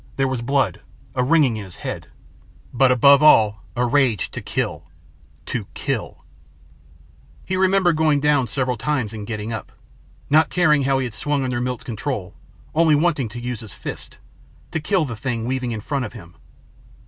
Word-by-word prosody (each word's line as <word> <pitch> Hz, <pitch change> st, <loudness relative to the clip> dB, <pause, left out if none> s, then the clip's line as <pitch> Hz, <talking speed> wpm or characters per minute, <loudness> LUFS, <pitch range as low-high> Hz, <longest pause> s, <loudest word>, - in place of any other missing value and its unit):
There 135 Hz, 0 st, +1 dB
was 130 Hz, -2 st, -2 dB
blood, 135 Hz, +2 st, 0 dB, 0.3 s
a -, -, 0 dB
ringing 140 Hz, -4 st, +3 dB
in 105 Hz, -, -5 dB
his 95 Hz, -3 st, -11 dB
head. -, -, -6 dB, 0.7 s
But 130 Hz, +1 st, +4 dB
above 140 Hz, +3 st, +6 dB
all, 110 Hz, -8 st, +5 dB
a 125 Hz, 0 st, +1 dB
rage 125 Hz, -, +1 dB
to -, -, -6 dB
kill. -, -, -3 dB, 0.6 s
To -, -, -4 dB
kill. -, -, -4 dB, 1.2 s
He 185 Hz, -, -2 dB
remembered 185 Hz, -3 st, +3 dB
going 155 Hz, -2 st, +3 dB
down 145 Hz, -3 st, +2 dB
several 125 Hz, +1 st, -1 dB
times 130 Hz, -4 st, -1 dB
and 105 Hz, -2 st, -7 dB
getting 110 Hz, 0 st, -4 dB
up. 110 Hz, -, -6 dB, 0.6 s
Not 155 Hz, +2 st, +4 dB
caring 150 Hz, -6 st, +3 dB
how 135 Hz, 0 st, +2 dB
he 135 Hz, -, 0 dB
had 120 Hz, -, -6 dB
swung 145 Hz, +5 st, -1 dB
under 125 Hz, -2 st, -2 dB
Milt's 125 Hz, -1 st, -3 dB
control 110 Hz, -4 st, -4 dB, 0.4 s
only 160 Hz, -1 st, +4 dB
wanting 150 Hz, -6 st, +1 dB
to 120 Hz, +3 st, -7 dB
use 125 Hz, -1 st, -4 dB
his 110 Hz, -4 st, -10 dB
fists -, -, -8 dB, 0.5 s
to 160 Hz, -, -1 dB
kill 175 Hz, +1 st, +1 dB
the 120 Hz, -4 st, -5 dB
thing 115 Hz, -1 st, -3 dB
weaving 130 Hz, -1 st, -2 dB
in 110 Hz, -2 st, -4 dB
front 135 Hz, +3 st, -2 dB
of 105 Hz, -, -8 dB
him. 85 Hz, -7 st, -12 dB
130 Hz, 175 wpm, -21 LUFS, 115-150 Hz, 1.2 s, above